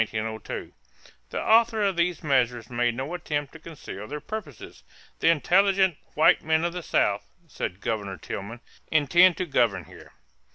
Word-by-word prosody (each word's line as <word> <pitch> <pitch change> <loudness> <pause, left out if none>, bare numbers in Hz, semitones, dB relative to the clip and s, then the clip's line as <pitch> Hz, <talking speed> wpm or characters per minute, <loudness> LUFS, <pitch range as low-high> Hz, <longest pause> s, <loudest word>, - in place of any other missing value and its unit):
The 110 0 -4 0.7
authors 220 -2 +3
of 190 - -4
these 170 -1 0
measures 125 -5 0
made 120 -1 0
no 135 +7 -4
attempt 145 -4 -3
to 160 - -11
conceal 145 -11 -9
their 150 +1 -5
purposes. 175 - -8 0.4
"The - - +3
intelligent 190 +3 +3 0.2
white 155 - +5
men 160 +1 +1
of 170 - -2
the 180 - -4
South," - - +1 0.2
said 90 +2 -5
Governor 100 -4 -3
Tillman, 115 +5 -7 0.3
"intend 170 +4 +4
to 185 - -1
govern 115 - +1
here." - - -15
150 Hz, 150 wpm, -26 LUFS, 120-175 Hz, 0.7 s, white